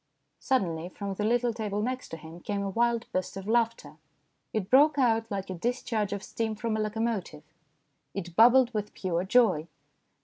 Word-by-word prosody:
Suddenly 175 - 0
from 200 +1 -5
the 210 - -3
little 240 +2 +2
table 210 -3 -3
next 255 +4 -3
to 165 - -6
him 160 +2 -11
came 200 +2 -3
a 195 - -2
wild 235 +2 +1
burst 185 +1 -2
of 195 +1 -7
laughter. 225 -10 0 0.5
It 215 -4 -2
broke 290 +3 +6
out 225 -4 +2
like 195 -2 -4
a - - -2
discharge 220 +1 -2
of 200 -1 -4
steam 220 -1 -3
from 220 +1 -2
a - - -1
locomotive. 215 -7 -2 0.7
It 175 -3 -5
bubbled 245 +3 +6
with 210 -1 -4
pure 180 -2 -1
joy. 190 -7 +3
215 Hz, 175 wpm, -28 LUFS, 190-235 Hz, 0.7 s, broke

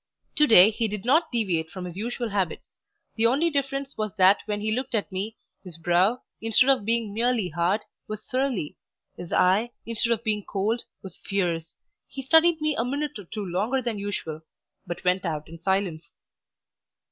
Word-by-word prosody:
Today 220 -9 +7
he 225 +1 -1
did 210 -1 -5
not 315 +6 +3
deviate 185 -9 0
from 180 +1 -7
his 175 -1 -7
usual 235 +3 -3
habits; 195 -5 -3 0.4
the 225 +1 +4
only 295 +8 +2
difference 275 -2 -2
was 215 -2 -2
that 190 0 +5
when 210 -1 -2
he 215 +1 -1
looked 250 +1 -2
at 210 -1 -1
me, 200 +4 -4 0.3
his 180 -4 -9
brow, 180 +8 +2 0.2
instead 225 +4 +4
of 255 -7 +1
being 230 -2 0
merely 230 -3 +1
hard, 175 +6 0 0.3
was 215 0 -6
surly; 255 - -1 0.4
his 175 - -9
eye, 195 +6 +3 0.2
instead 230 +1 -1
of 230 -1 0
being 210 -1 0
cold, 210 +5 -1 0.2
was 190 -3 -9
fierce. 170 -5 -2 0.3
He 270 - -7
studied 320 +4 +5
me 305 -1 +1
a 230 - 0
minute 285 0 -3
or 200 - -10
two 210 +3 -5
longer 205 +9 0
than 235 -4 -3
usual, 165 -6 -4 0.5
but 175 0 -6
went 180 +1 +2
out 155 -4 -3
in 165 0 -11
silence. 185 -2 -1
210 Hz, 180 wpm, -25 LUFS, 185-245 Hz, 0.5 s, Today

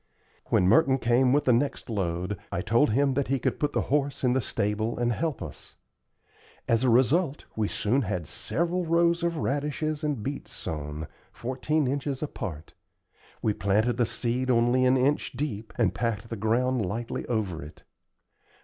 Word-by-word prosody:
When 90 - +3
Merton 130 - +5
came 125 +1 +3
with 145 +2 +3
the 125 - +5
next 135 +5 0
load 90 -3 -2 0.2
I - - -1
told 115 +10 +3
him 135 +5 +2
that 140 +1 0
he 135 - +1
could - - -1
put 150 - 0
the - - +1
horse 145 -2 0
in 125 -1 +3
the 130 - +2
stable 105 +1 -1
and 120 0 +1
help 155 +4 -2
us. - - -10 0.9
As 115 +1 +2
a 130 - +4
result, 135 - +2
we 110 -2 0
soon 120 +8 +1
had 90 - -2
several 170 - -1
rows 170 +1 +2
of 170 -1 0
radishes 150 +2 -1
and 145 -8 -1
beets 140 +3 -5
sown, 75 0 -5 0.3
fourteen 135 +5 -1
inches 140 +1 -2
apart. 85 - -6 0.7
We 110 - +2
planted 105 +5 +1
the 120 - +2
seed 125 +2 -1
only 120 +1 +3
an 130 +1 +4
inch 140 +3 +1
deep, 115 -7 -4
and - - +2
packed 115 -1 -2
the 115 - -3
ground 115 +3 +1
lightly 115 +5 -3
over 100 -8 -1
it. 75 +2 -12
125 Hz, 170 wpm, -27 LUFS, 110-145 Hz, 0.9 s, Merton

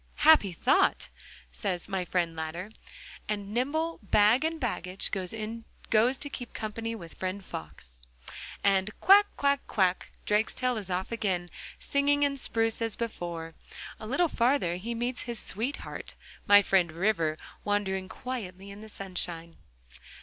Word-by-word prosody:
'Happy 300 -11 +6
thought!' 165 - +2 0.4
says 175 - -3
my 190 -2 -1
friend 170 -2 -1
Ladder, 165 +5 -5 0.6
and 205 -1 -3
nimble, 315 +7 0
bag 210 +5 +4
and 320 0 -1
baggage, 195 - -1
goes 220 +4 -1
to 285 - -4
keep 250 -4 -7
company 225 +1 -4
with 170 -6 -10
friend 185 +1 -4
Fox. 65 -6 -8 0.6
And 195 0 +3
'Quack, 405 +2 +7
quack, 280 -1 +3
quack.' 185 -3 +1 0.2
Drakestail 225 +4 +1
is 195 -3 -9
off 185 +3 -2
again, 190 -6 -1 0.3
singing 285 +1 +2
and 275 -1 -1
spruce 225 -2 0
as 225 -2 0
before. 170 -8 -4 0.5
A 215 - -7
little 335 +9 +2
farther 240 - +1
he 230 +6 -4
meets 240 +2 -2
his 235 - -2
sweetheart, 230 +7 -4 0.3
my 205 0 +8
friend 185 -5 +3
River, 165 -4 +1 0.3
wandering 190 -2 -1
quietly 200 -7 -6
in 200 +1 -10
the 220 - -10
sunshine. 175 -4 -4
210 Hz, 135 wpm, -29 LUFS, 180-240 Hz, 0.6 s, my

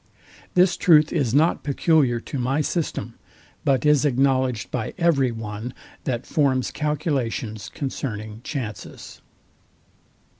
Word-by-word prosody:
This 180 0 +4
truth 155 -3 +5
is 130 -6 +1
not 155 +6 +3
peculiar 140 -3 +2
to 140 - -5
my 135 +4 +1
system, 165 +2 -2 0.5
but 135 0 +2
is 150 -2 +4
acknowledged 130 -7 +1
by 110 - -3
every 155 -8 +3
one, 110 +1 -6 0.3
that 125 -2 -2
forms 135 -4 +1
calculations 135 -8 -2
concerning 110 -6 -5
chances. 115 - -7
135 Hz, 110 wpm, -23 LUFS, 115-150 Hz, 0.5 s, truth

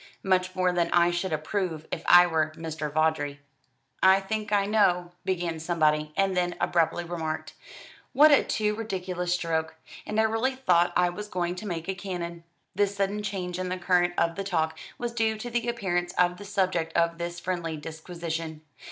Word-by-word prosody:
"Much 185 -1 +1
more 185 -1 +2
than 175 -1 +1
I 175 0 +4
should 175 +2 -2
approve 160 +1 -2
if - - -3
I 175 0 +9
were 160 -2 0
Mr. 155 -2 -5
Vawdrey." 150 -2 0 0.6
"I 190 +1 +6
think 215 +2 -4
I 200 -1 +3
know 180 -4 +2
" - - -43
began 175 -3 -1
somebody, 155 -2 +1
and 195 -1 +2
then 175 -1 0
abruptly 175 0 +1
remarked: 165 -2 -4 0.6
"What 300 +3 +7
a 285 - +6
too 210 -1 0
ridiculous 185 -5 -3
stroke! 160 -2 -2 0.3
And 210 +1 -1
I - - +5
really 225 +4 +1
thought 175 -10 +3
I 180 0 +4
was 205 +4 -6
going 175 -3 -2
to 210 - -6
make 170 -2 -4
a 190 - 0
cannon." 175 -3 -5 0.3
This 205 0 +1
sudden 200 +1 -1
change 185 -3 -4
in 185 0 -2
the 185 - -2
current 175 -1 +2
of 165 0 +2
the 195 - -2
talk 160 -4 0 0.2
was 240 -1 -3
due 220 -2 +1
to 240 +3 -6
the 240 0 0
appearance 175 -6 -1
of 180 0 +2
the 205 - -9
subject 185 -5 0
of 170 0 +1
this 170 0 -4
friendly 175 -3 -3
disquisition. 160 0 -6
180 Hz, 185 wpm, -27 LUFS, 165-195 Hz, 0.6 s, I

